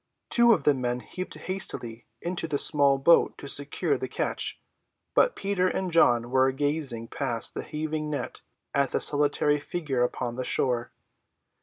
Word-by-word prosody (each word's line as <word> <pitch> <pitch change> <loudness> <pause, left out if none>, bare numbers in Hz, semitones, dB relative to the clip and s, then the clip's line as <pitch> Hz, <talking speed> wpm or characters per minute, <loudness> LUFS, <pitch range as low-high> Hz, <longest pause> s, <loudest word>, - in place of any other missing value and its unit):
Two 235 0 +6
of 180 -10 +2
the 145 - +4
men 125 -2 -3
leaped 185 0 -4
hastily 120 - -3 0.2
into 175 -1 -2
the 150 -2 -1
small 140 -2 +4
boat 165 +5 +4
to 140 - -9
secure 145 - -1
the - - -3
catch, - - -3 0.5
but - - +3
Peter 195 -2 0
and 185 0 -2
John 120 -7 +3
were 130 0 +3
gazing 135 -5 -2
past 120 -5 -2
the - - -4
heaving 155 0 -4
net 145 - -5 0.3
at 140 -1 +1
that - - +1
solitary 145 0 +3
figure 145 -4 -3
upon 125 -1 -3
the 130 - -2
shore. 125 -1 -1
145 Hz, 160 wpm, -26 LUFS, 125-165 Hz, 0.5 s, Two